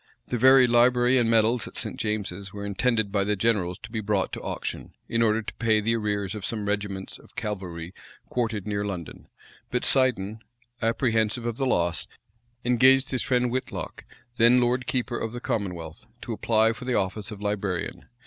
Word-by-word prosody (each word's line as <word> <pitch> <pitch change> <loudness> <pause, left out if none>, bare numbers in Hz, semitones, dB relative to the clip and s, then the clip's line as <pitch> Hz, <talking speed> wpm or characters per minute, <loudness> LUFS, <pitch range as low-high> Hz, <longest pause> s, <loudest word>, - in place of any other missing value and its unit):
The 125 - 0
very 130 +1 +7
library 125 +1 +4
and 115 -2 +2
medals 115 0 +3
at - - -7
St. - - -3
James's 100 -3 -3
were 100 0 -6
intended 110 +1 +1
by 100 -1 +1
the 105 +1 0
generals 95 -4 +1
to 100 - -9
be 110 - -2
brought 100 -2 0
to - - -4
auction, - - -5
in 115 - 0
order 110 0 +2
to - - -7
pay 110 -2 +2
the 115 +2 +1
arrears 105 -3 -1
of 105 -3 -6
some 105 0 -2
regiments 100 -2 -3
of - - -20
cavalry 90 -5 -5 0.3
quartered 110 -5 -2
near 100 -1 -1
London; 90 -5 -6 0.4
but, 125 - -1
Seiden, 110 -6 +1 0.4
apprehensive 115 0 +1
of 120 -1 -2
the 135 - 0
loss, 85 -7 +1 0.6
engaged 130 +2 +5
his 130 -3 0
friend 125 -1 +1
Whitlocke, 130 +1 -4 0.3
then 120 +1 +6
lord 125 +1 +1
keeper 125 -5 -1
for - - -1
the 120 +2 -7
commonwealth, 90 -9 -4 0.2
to - - -4
apply 110 0 +2
for 125 - -9
the 125 -2 0
office 100 +3 -1
of 105 -3 -8
librarian. 100 -3 -3
110 Hz, 180 wpm, -26 LUFS, 100-120 Hz, 0.6 s, very